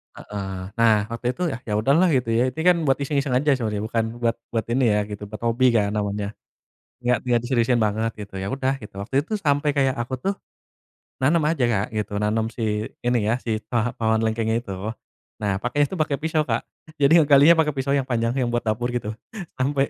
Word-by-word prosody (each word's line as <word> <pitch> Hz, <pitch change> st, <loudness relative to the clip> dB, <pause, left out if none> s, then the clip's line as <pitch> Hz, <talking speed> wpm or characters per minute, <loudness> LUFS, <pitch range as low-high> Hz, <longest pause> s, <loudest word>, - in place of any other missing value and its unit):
Heeh. 95 Hz, -2 st, -6 dB, 0.2 s
Nah, 115 Hz, -1 st, +6 dB, 0.2 s
waktu 115 Hz, +1 st, -3 dB
itu 180 Hz, -, -8 dB
ya, 115 Hz, -, -4 dB
"Ya 105 Hz, -, -2 dB
udah, 110 Hz, +6 st, +2 dB
lah," 185 Hz, +1 st, +4 dB
gitu 125 Hz, -3 st, 0 dB
ya. 120 Hz, +3 st, +3 dB
Ini 160 Hz, -, -4 dB
kan 180 Hz, 0 st, +5 dB
buat 135 Hz, -, +3 dB
iseng-iseng 140 Hz, -2 st, 0 dB
aja 145 Hz, +3 st, +3 dB
sebenarnya, 105 Hz, -4 st, -2 dB
bukan 115 Hz, +1 st, 0 dB, 0.2 s
buat 115 Hz, -1 st, +1 dB, 0.2 s
buat 110 Hz, -2 st, 0 dB
ini 125 Hz, +1 st, +2 dB
ya, 105 Hz, -, +2 dB
gitu. 105 Hz, 0 st, -7 dB
Buat 110 Hz, +2 st, -9 dB
hobi, 120 Hz, +2 st, +3 dB
kan 105 Hz, -2 st, +2 dB
namanya. 105 Hz, -1 st, -2 dB, 0.7 s
Nggak 125 Hz, -1 st, +3 dB
nggak 120 Hz, -1 st, +3 dB
diseriusin 120 Hz, -1 st, +2 dB
banget, 110 Hz, +1 st, 0 dB
gitu. 105 Hz, -2 st, -9 dB
Ya 95 Hz, -, -3 dB
udah, 135 Hz, 0 st, 0 dB
gitu. 105 Hz, -, -11 dB
Waktu 115 Hz, +6 st, -6 dB
itu 220 Hz, -, -5 dB
sampai 145 Hz, -3 st, +1 dB
kayak, 135 Hz, -2 st, +2 dB
aku 125 Hz, +2 st, -2 dB
tuh 195 Hz, +9 st, -1 dB, 0.9 s
nanam 150 Hz, +4 st, +3 dB
aja 160 Hz, -6 st, 0 dB
Kak, 105 Hz, -4 st, +1 dB
gitu. 105 Hz, -1 st, -3 dB
Nanam 110 Hz, +1 st, +1 dB
si 110 Hz, -2 st, -2 dB
ini 120 Hz, 0 st, +3 dB
ya, 110 Hz, -, +3 dB
si 110 Hz, -2 st, -1 dB
paha 120 Hz, 0 st, +1 dB
pohon 110 Hz, -1 st, +2 dB
lengkeng 110 Hz, 0 st, 0 dB
itu. 115 Hz, -2 st, -2 dB, 0.7 s
Nah, 100 Hz, -2 st, 0 dB
pakainya 145 Hz, +7 st, +1 dB
tuh 185 Hz, -, -4 dB
pake 150 Hz, -2 st, +1 dB
pisau, 155 Hz, -1 st, +1 dB
Kak. -, -, 0 dB, 0.4 s
Jadi 150 Hz, +5 st, +6 dB
ngegalinya 150 Hz, +2 st, +6 dB
pake 155 Hz, -1 st, +3 dB
pisau 135 Hz, +1 st, -1 dB
yang 140 Hz, -2 st, +1 dB
panjang, 115 Hz, -2 st, 0 dB
yang 125 Hz, -, +1 dB
buat 120 Hz, 0 st, -1 dB
dapur 110 Hz, +2 st, -1 dB
gitu. 110 Hz, -3 st, -2 dB, 0.5 s
Sampai 135 Hz, +1 st, +1 dB
120 Hz, 210 wpm, -23 LUFS, 110-140 Hz, 0.9 s, Nah